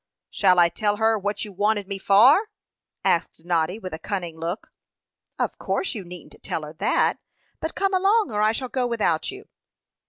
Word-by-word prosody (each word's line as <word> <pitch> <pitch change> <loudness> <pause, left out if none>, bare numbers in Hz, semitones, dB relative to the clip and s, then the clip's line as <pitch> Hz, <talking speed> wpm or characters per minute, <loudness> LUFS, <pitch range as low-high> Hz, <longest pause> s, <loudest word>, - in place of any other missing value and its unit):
"Shall 185 -3 +3
I 170 -1 +6
tell 205 +4 0
her 220 0 +2
what 205 +1 -2
you 210 - -9
wanted 205 +1 0
me 195 -1 -4
for?" 255 - +5 0.6
asked 165 -1 0
Noddy, 175 +2 0
with 185 -6 -7
a 160 - -5
cunning 175 -2 -4
look. 165 +5 -5 0.7
"Of - - -2
course 385 - -1
you 210 -5 -6
needn't 180 -2 -11
tell 160 - -3
her 150 0 -8
that. - - +2 0.4
But 320 - -4
come 390 0 0
along, 390 - +3
or 210 -1 -1
I 215 +1 +4
shall 255 +3 -4
go 250 -1 0
without 210 -9 0
you." 395 +2 -9
205 Hz, 185 wpm, -24 LUFS, 175-240 Hz, 0.7 s, I